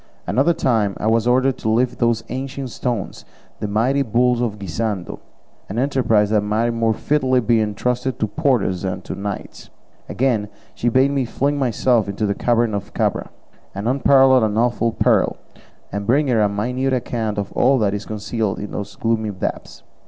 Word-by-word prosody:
Another 145 +7 +2
time 110 -9 +1
I - - -5
was 115 +1 +2
ordered 130 +1 +2
to 110 - -2
lift 120 +3 +1
those 115 -2 +1
ancient 135 0 -5
stones, 120 -5 -4 0.4
the 105 - -3
mighty 120 +7 +1
bulls 120 0 +2
of 110 -4 -2
Guisando, 100 0 -4 0.5
an 100 - -5
enterprise 120 -6 +2
that 105 -1 +3
might 110 +3 0
more 115 -1 +1
fitly 130 0 +1
be 115 -1 +2
entrusted 125 +4 -1
to - - 0
porters 115 - 0
than 95 -1 -3
to - - -6
knights. 100 0 -6 0.4
Again, 115 -5 0 0.2
she 120 - 0
bade 130 +3 +3
me 140 -2 0
fling 140 +5 -1
myself 120 -3 +1
into 100 +2 -2
the 100 - +1
cavern 120 0 +1
of 100 -1 -5
Cabra - - -1 0.5
an 100 +2 -4
unparalleled 130 0 +5
and 110 -1 0
awful 120 0 +1
peril - - +2 0.5
and 100 +1 -4
bring 140 +3 +3
her 115 -3 +3
a 105 - +3
minute 125 +6 -1
account 115 -4 -2
of 100 -1 -3
all 135 +2 +3
that 105 -4 +1
is 105 0 -5
concealed 110 -1 -2
in 105 - -6
those 100 0 -6
gloomy 115 -1 -1
depths. 95 -2 -5
115 Hz, 175 wpm, -20 LUFS, 105-130 Hz, 0.5 s, unparalleled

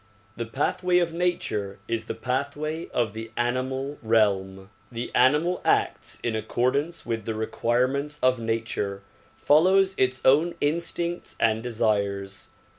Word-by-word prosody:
The 115 -1 -4
pathway 175 +8 +1
of 170 -2 +1
nature 165 - -1
is 115 -1 -2
the - - -4
pathway 145 +5 -3
of 115 -4 -1
the 110 +1 -6
animal 130 +3 -1
realm. 100 -4 +1 0.2
The 120 0 -5
animal 150 +8 +3
acts - - 0
in 115 -2 -1
accordance 130 +9 -1
with 115 -3 -3
the 110 - -2
requirements 125 +6 0
of 130 -1 +4
nature, 110 -3 -2 0.3
follows 190 +6 +4
its 130 0 +2
own 155 +6 +4
in 150 +3 +2
stincts 170 +1 -4
and 110 0 +2
desires. 100 -4 -1
125 Hz, 130 wpm, -26 LUFS, 110-150 Hz, 0.3 s, of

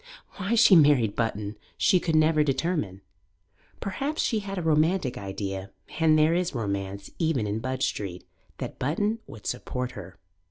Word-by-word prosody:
Why 205 +4 0
she 220 -4 +7
married 140 - +5
Button 105 -2 -2 0.2
she 185 - +4
could 165 -2 -1
never 155 0 +4
determine. 135 - -1 0.8
Perhaps 275 +10 -2
she 225 - +1
had 195 -1 -6
a 180 - -2
romantic 160 -2 +2
idea 95 -1 -5 0.3
and 160 -1 +5
there 155 +2 +4
is 175 -3 0
romance 100 -3 -3
even 160 -9 +1
in 105 +1 -2
Budge 130 +2 -1
Street 90 -3 -4 0.3
that - - -6
Button 205 - 0
would 110 - -12
support 125 0 -3
her. 95 -5 -10
145 Hz, 155 wpm, -27 LUFS, 105-175 Hz, 0.8 s, she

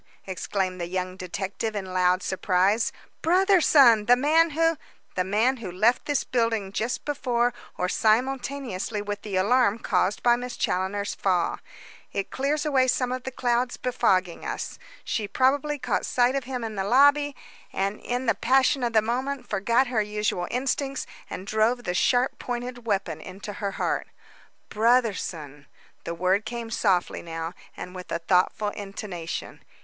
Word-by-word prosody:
exclaimed 185 -1 -2
the 170 - -2
young 185 0 -3
detective 190 +4 -4
in 200 -2 -3
loud 185 0 +1
surprise. 190 +4 +1 0.3
"Brotherson! 320 - +5
The 245 - +7
man 315 +6 +4
who 330 +2 +2 0.2
" - - -37
"The 185 - +1
man 220 +8 +2
who 210 -6 -6
left 220 +7 +2
this 290 -2 0
building 230 -5 0
just 230 +5 -2
before 245 -4 0 0.2
or 180 - 0
simultaneously 235 -1 0
with 205 0 -4
the 205 -3 -5
alarm 215 +3 +3
caused 195 -3 0
by 240 -1 +5
Miss 245 0 -6
Challoner's 195 +2 -1
fall. 180 -3 0 0.5
It 195 - -3
clears 290 +3 -1
away 265 -3 +3
some 250 0 +1
of 255 0 -4
the 265 - -3
clouds 245 0 0
befogging 185 -8 +1
us. - - -5 0.2
She 215 -4 -2
probably 275 +7 +1
caught 265 - -1
sight 245 +1 +3
of 275 -2 -2
him 250 -2 -4
in 225 -1 -4
the 195 -2 -2
lobby, 285 +6 +4 0.4
and 200 +2 -2
in 245 +1 -3
the 225 - +3
passion 265 +5 +3
of 235 -1 0
the 220 -1 +4
moment 255 +3 -2
forgot 235 +7 +2
her 245 -4 0
usual 210 -4 -1
instincts 270 +2 -1 0.2
and 185 - -6
drove 220 +4 +1
the 180 - -2
sharp 245 +8 +2
pointed 245 -1 -5
weapon 190 -7 -1
into 195 +4 -8
her 200 -1 -3
heart." - - -1 0.6
"Brotherson!" 195 - 0 0.4
The 170 - -3
word 185 +4 +1
came 230 +1 -5
softly 190 -6 +1
now, 165 0 -5 0.2
and 180 - -7
with 185 -1 -9
a - - +1
thoughtful 180 +4 +1
intonation. 195 -4 -6
220 Hz, 160 wpm, -26 LUFS, 190-255 Hz, 0.6 s, The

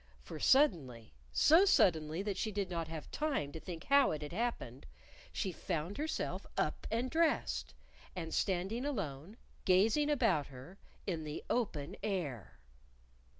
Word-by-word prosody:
For 115 - -8
suddenly 140 - +2 0.2
so 325 - +6
suddenly 165 - +3
that 205 -2 -2
she 215 +3 -2
did 200 -2 -3
not 165 -2 -2
have 160 -2 -7
time 285 - -1
to 160 - -7
think 165 0 -7
how 280 0 +5
it 150 -1 -3
had 150 - -7
happened 185 - -3 0.4
she 190 - -2
found 175 - -4
herself 315 +1 -3
up - - -1
and 235 +3 0
dressed, 325 -1 0 0.4
and 165 -3 -5
standing 195 +5 0
alone, 195 - -4 0.3
gazing 215 +11 +3
about 180 - +2
her, 140 +8 -12 0.3
_in 165 -5 -2
the 150 0 -6
open 155 -12 -1
air! 155 - -3
185 Hz, 145 wpm, -34 LUFS, 155-235 Hz, 0.4 s, so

